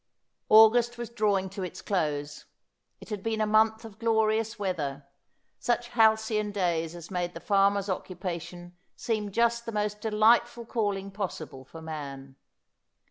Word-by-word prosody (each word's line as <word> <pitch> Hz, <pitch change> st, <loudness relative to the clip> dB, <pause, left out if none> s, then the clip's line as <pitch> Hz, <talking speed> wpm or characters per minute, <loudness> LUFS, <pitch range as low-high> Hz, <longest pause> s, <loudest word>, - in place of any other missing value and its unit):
August 230 Hz, +2 st, +6 dB
was 235 Hz, -1 st, -6 dB
drawing 205 Hz, -4 st, +1 dB
to 195 Hz, +1 st, -7 dB
its 185 Hz, 0 st, -5 dB
close. 150 Hz, -6 st, -2 dB, 0.5 s
It -, -, -13 dB
had 210 Hz, -3 st, -4 dB
been 220 Hz, +1 st, -2 dB
a 215 Hz, -, +2 dB
month 220 Hz, +1 st, +3 dB
of 220 Hz, -1 st, -12 dB
glorious 220 Hz, -1 st, +1 dB
weather, 150 Hz, -9 st, -3 dB, 0.5 s
such 240 Hz, 0 st, -1 dB
halcyon 220 Hz, -2 st, +3 dB
days 170 Hz, -4 st, -1 dB
as 170 Hz, +2 st, -10 dB
made 175 Hz, -1 st, -2 dB
the -, -, -5 dB
farmer's 200 Hz, 0 st, +2 dB
occupation 175 Hz, -2 st, -5 dB, 0.2 s
seem 215 Hz, -3 st, -2 dB
just 235 Hz, +2 st, +1 dB
the -, -, -2 dB
most 210 Hz, -1 st, -2 dB
delightful 225 Hz, +2 st, +3 dB
calling 200 Hz, -4 st, -2 dB
possible 170 Hz, -9 st, -5 dB
for 160 Hz, +4 st, -11 dB
man. 140 Hz, -4 st, -7 dB
205 Hz, 140 wpm, -28 LUFS, 175-220 Hz, 0.5 s, August